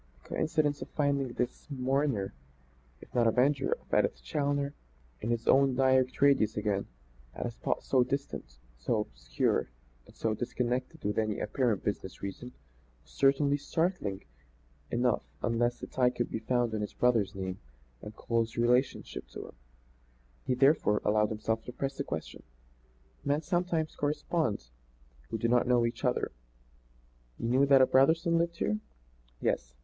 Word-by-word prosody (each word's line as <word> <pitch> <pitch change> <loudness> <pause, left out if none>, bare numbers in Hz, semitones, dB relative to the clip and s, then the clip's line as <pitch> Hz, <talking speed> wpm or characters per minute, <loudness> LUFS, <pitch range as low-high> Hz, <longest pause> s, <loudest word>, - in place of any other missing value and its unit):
The - - -19
coincidence 150 -3 0
of 130 - -6
finding 140 -4 0
this 125 - -3
mourner 135 -6 0 0.7
if - - -15
not 120 -2 +3
avenger 135 - +3
of 485 - -11
Edith - - +2
Challoner, 145 -2 -1 0.5
in 110 - -3
his 115 -1 -1
own 135 -1 +5
direct 130 -1 +3
radius 125 -7 +4
again, 105 -2 0 0.5
at - - -4
a - - -2
spot - - -2
so 130 -2 +3
distant, 125 - -4 0.2
so 105 - +1
obscure - - -1 0.4
and - - -17
so 110 - 0
disconnected 125 +2 -2
with 105 +2 0
any 110 -1 -1
apparent 120 -7 0
business 100 -2 -4
reason, 100 +6 -6 0.5
was - - -23
certainly 140 +1 +3
startling 145 - -1 0.7
enough 120 +1 +1 0.2
unless 120 +1 +1
the - - -5
tie 125 -1 +2
could 120 -1 -3
be 110 - -2
found 120 0 0
in 110 - -1
his 105 - -4
brother's 110 -5 +2
name 95 -1 -4 0.4
and 105 - -9
close 115 -1 -1
relationship 125 +3 +1
to - - -23
himself. - - -8 0.9
He, 125 - +2
therefore, 135 -6 +3
allowed 105 0 +3
himself 110 +1 -2
to - - -6
press 135 +2 -4
the 140 - -1
question: 80 -11 -5 0.8
"Men 145 +3 0
sometimes 175 -1 0
correspond 145 - -1 0.6
who - - -2
do 115 - 0
not 120 +1 +3
know 120 -1 +4
each 115 0 -3
other. - - +1 1.1
You 115 - -2
knew 130 +3 +4
that 135 -1 +7
a - - +7
Brotherson 165 +6 +4
lived 170 0 -1
here?" 105 +1 0 0.6
"Yes." - - -1
125 Hz, 155 wpm, -30 LUFS, 110-140 Hz, 1.1 s, that